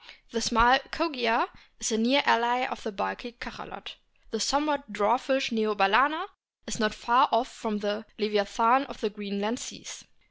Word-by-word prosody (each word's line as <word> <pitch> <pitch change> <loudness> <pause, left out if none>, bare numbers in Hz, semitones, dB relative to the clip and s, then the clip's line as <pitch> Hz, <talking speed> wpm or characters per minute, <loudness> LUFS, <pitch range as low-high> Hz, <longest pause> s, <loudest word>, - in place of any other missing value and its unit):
The 230 - -2
small 240 +3 +5
Kogia 260 -3 0 0.3
is - - -1
a 220 - +1
near 260 +5 +4
ally 240 +2 +3
of - - -6
the 225 - -5
bulky 195 - -5
Cachalot. 240 - -10 0.3
The 225 - -3
somewhat 285 +1 0
dwarfish 245 +6 +1
Neo 215 -2 0
balcena 255 - +3 0.4
is - - -5
not 215 -1 0
far 240 +2 +3
off 230 +3 +1
from 220 -2 -4
the 205 +1 -4
leviathan 215 +5 +2
of - - -11
the 220 -2 -2
Green 200 -1 -6
land 220 +5 -2
seas. - - -9
230 Hz, 165 wpm, -27 LUFS, 210-260 Hz, 0.4 s, small